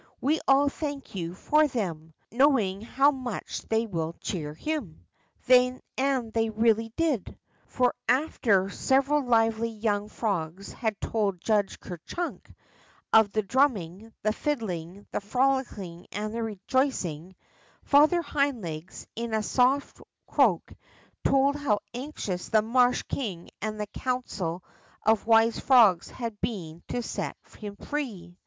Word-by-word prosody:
We 310 +3 +1
all 275 +1 +5
thank 285 -1 -4
you 175 -2 -4
for 305 +9 +3
them, 165 - -4 0.2
know 270 +4 +5
ing 195 -3 -2
how 270 +5 +3
much 255 -6 -5
they 225 +1 +2
will 165 -5 -3
cheer 150 -5 -4
him." 245 - -4 0.4
And 255 -1 +2
they 225 -1 +1
really 225 +1 +2
did. 305 - 0 0.3
For 250 -1 +1 0.2
after 240 -8 +2
several 275 +5 +2
lively 225 -2 +2
young 210 -2 -1
frogs 195 -4 -3
had 220 -3 -2
told 205 -5 -1
Judge 205 0 0
Ker 175 -3 -8
Chunk 350 0 -5 0.6
of 220 -2 +6
the 215 +1 0
drumming, 220 - 0
the 215 0 +2
fiddling, 200 - -3
the - - -2
frolicking, 215 -7 -1
and 210 +2 -3
rejoic 230 +3 0
ing, 170 +3 -7 0.5
Father 310 +5 +5
Hind 280 -3 0
Legs, 160 +1 -7
in 230 -1 -2
a 215 - 0
soft 260 +5 +1 0.2
croak, - - +2 0.5
told 275 +1 +3
how 280 -8 +1 0.2
anxious 240 -9 -4
the 215 -2 +4
marsh 245 +2 +3
king 190 -10 -5
and 215 0 -3
the 210 - -1
council 205 -7 -3 0.4
of 220 0 +3
wise 225 0 +5
frogs 220 -10 +5
had 230 -4 -6
been 170 -7 -4
to 245 - -2
set - - -4 0.2
him 205 -2 -7
free. 200 -11 -5
225 Hz, 135 wpm, -27 LUFS, 195-260 Hz, 0.6 s, of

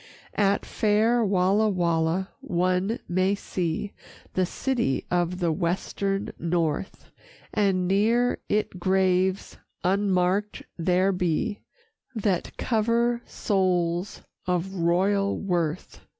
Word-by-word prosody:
IX - - -14
At 200 -1 +2
fair 220 +3 +2
Walla 200 +2 +3
Walla 170 0 0
one 185 +5 0
may 185 +3 +2
see 185 0 -3 0.4
The 185 -1 +1
city 235 - -1
of 175 0 +1
the 175 -3 +1
Western 195 +4 -1
North, 170 +1 -2 0.4
And 190 -3 +2
near 225 +6 +2
it 210 -3 -1
graves 185 +1 +1 0.3
unmarked 195 +1 +1
there 180 +3 +2
be 180 +2 -1 0.6
That 200 -5 -1
cover 235 +1 +1
souls 180 -2 0 0.2
of 180 +1 -1
royal 195 +3 +1
worth. 175 -4 -2
190 Hz, 100 wpm, -26 LUFS, 175-205 Hz, 0.6 s, Walla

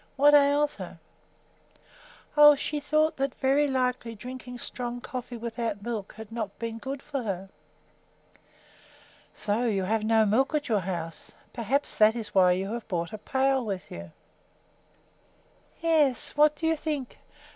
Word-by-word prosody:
What 290 +2 +5
ails 290 +1 +4
her?" - - -8 1.4
"Oh, 295 -1 +9
she 295 +1 -3
thought 310 +2 +1
that 270 -1 -1
very 275 +2 +2
likely 250 -3 -1
drinking 250 +2 -8
strong 245 0 -4
coffee 250 -1 -6
without 230 -3 -4
milk 220 -4 -4
had 220 0 -9
not 220 -3 -4
been 230 -1 -5
good 270 +3 -6
for 285 -3 -3
her." 195 -4 -4 1.9
"So 210 +3 -1
you 200 -5 +1
have 215 +3 0
no 220 0 +4
milk 260 +9 +2
at 295 -1 -1
your 215 -3 +3
house. 170 -3 -5 0.2
Perhaps 255 +5 -1
that 215 +1 +5
is 225 -3 -6
why 185 -2 +5
you 195 +4 -2
have 235 -2 -5
brought 170 -3 -3
a 215 - -6
pail 265 +3 +1
with 195 -4 -5
you." 85 0 -8 1.7
"Yes; 310 -6 +2
what 300 +1 +5
do 320 - -4
you 320 0 +3
think! 300 -4 -4
240 Hz, 150 wpm, -27 LUFS, 215-280 Hz, 1.9 s, Oh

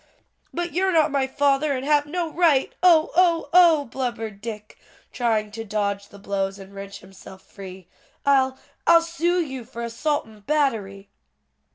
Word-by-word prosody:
"But 345 0 -4
you're 375 +2 +1
not 315 -3 +3
my 275 -2 0
father, 285 +1 +1
and 260 - -5
have 295 0 +2
no 345 +2 -2
right, 315 -6 +2
oh, 335 -3 +5
oh, 335 -4 +3
oh!" 335 -5 +6
blubbered 230 -5 -5
Dick, 215 -1 -8 0.3
trying 220 -4 -1
to 225 +2 -6
dodge 200 -1 -2
the 205 - -15
blows 195 -1 -3
and 195 0 -13
wrench 200 0 -9
himself 190 0 -14
free, 190 -2 -11 0.4
"I'll 265 -2 +3 0.3
I'll 335 0 +6
sue 340 +2 0
you 265 -7 -4
for 235 0 -8
assault 290 +6 -2
and 215 -2 -17
battery." 210 -10 -1
260 Hz, 160 wpm, -23 LUFS, 205-310 Hz, 0.4 s, oh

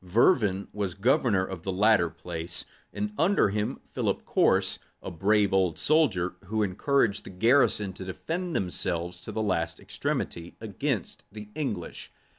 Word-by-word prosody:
Vervin 100 - +3
was 100 -4 -2
governor 105 -2 +2
of 95 -3 -7
the 95 - -3
latter 100 -2 +4
place, 85 +1 -5 0.3
and 210 0 -3
under 195 - +4
him 105 +1 -2
Philip - - -1
Corse, - - +2 0.2
a - - -7
brave 100 +3 +2
old 95 -4 +2
soldier, 115 - +2
who 110 +3 0
encouraged 105 +2 +1
the - - -10
garrison 105 -1 +3
to 95 - -8
defend 170 - -4
themselves 90 0 -2
to - - -7
the 110 - -2
last 90 -5 -1
extremity 85 0 -3
against 110 - -3
the 105 0 -9
English. 105 - -4
100 Hz, 145 wpm, -28 LUFS, 90-115 Hz, 0.3 s, latter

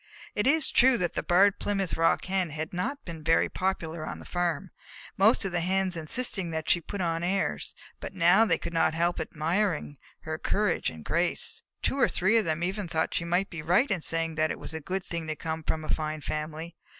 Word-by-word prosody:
It 210 +4 0
is 315 +1 +3
true 260 0 +5
that 175 -5 -1
the - - -1
Barred 190 +3 +4
Plymouth 195 -3 -1
Rock 165 0 +2
Hen 185 -2 0
had 155 +3 -5
not 265 +11 -3
been 165 -3 -7
very 165 +1 +3
popular 170 -4 -2
on - - -5
the - - -12
farm, 175 0 -2 0.4
most 210 +2 +4
of 195 - -2
the 175 - 0
Hens 190 +1 +1
insisting 175 +3 -2
that 160 -1 -4
she 175 - +4
put 200 +4 -5
on 165 -1 0
airs, 190 +3 -1 0.2
but - - -7
now 180 +4 +6
they 180 -7 +2
could 170 - -6
not 160 -1 +2
help 170 +1 +1
admiring 165 -1 -1 0.2
her 155 0 -5
courage 205 -2 +1
and 80 -1 -11
grace. 170 +1 +1 0.2
Two 275 - 0
or - - +4
three 195 +6 +3
of 220 - +2
them 160 +1 -1
even 190 +2 -2
thought 160 -1 -1
she 170 - -1
might 175 +3 0
be 170 -3 -5
right 180 - +2
in 185 -4 0
saying 165 0 0
that 155 0 +1
it - - -3
was - - -7
a 160 - -5
good 185 +5 -3
thing 170 -2 -5
to 155 - -2
come 160 0 -4
from 155 0 -2
a - - -9
fine 155 0 -2
family. 155 +3 -5
175 Hz, 220 wpm, -28 LUFS, 160-195 Hz, 0.4 s, now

